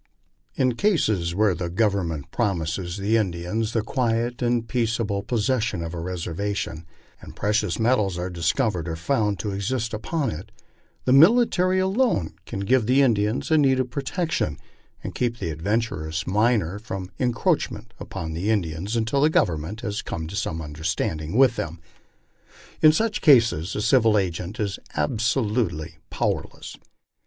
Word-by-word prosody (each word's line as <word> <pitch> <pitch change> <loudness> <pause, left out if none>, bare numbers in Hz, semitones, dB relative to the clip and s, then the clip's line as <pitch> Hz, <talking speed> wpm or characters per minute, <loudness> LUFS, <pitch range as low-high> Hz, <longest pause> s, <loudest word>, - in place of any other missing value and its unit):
In 130 -1 +2
cases 110 - +1
where 105 -1 +3
the 85 0 -4
Government 90 -7 -1
promises 85 -4 -1
the 105 +3 +2
Indians 105 +3 -2
the 115 - +1
quiet 120 0 -1
and 120 -1 +1
peaceable 110 -3 0
possession 110 -5 0
of 85 0 -5
a 85 - -4
reservation, 90 -1 -4 0.3
and - - -11
precious 105 -3 0
metals 110 -6 +1
are 90 +1 -3
discovered 90 - 0
or 80 - -2
found 105 +3 0
to 100 +4 -3
exist 110 +4 -2
upon 140 +7 -2
it, 80 +4 -8 0.5
the 130 - +4
military 185 - +5
alone 190 - +1
can 95 - -4
give 120 +2 +2
Mie 135 +2 +5
Indians 110 -2 +1
the 160 -1 +4
needed 130 -3 +2
protection, 140 - -2 0.5
and - - -5
keep 120 -2 -1
the 85 -7 -3
adventurous 80 -3 -2
miner 105 -2 +1
from 95 -4 -6
encroach 120 -3 +1
ing - - -8
upon 80 -1 -5
the 90 +6 -2
Indians 95 0 -1
until 115 +5 +1
the 150 - +5
Government 85 - 0
has 105 -3 -3
come 80 -1 -5
to 90 +5 -7
some 80 -5 -2
understanding 80 +3 -3
with 130 -2 +5
them. 85 0 -4 1.0
In 155 - +8
such 215 +6 0
cases 115 - +4
the 105 - -2
civil 115 -2 +4
agent 90 +3 -2
is 100 -3 -2 0.2
absolutely 105 - 0
powerless. - - -3
105 Hz, 145 wpm, -24 LUFS, 85-120 Hz, 1.0 s, In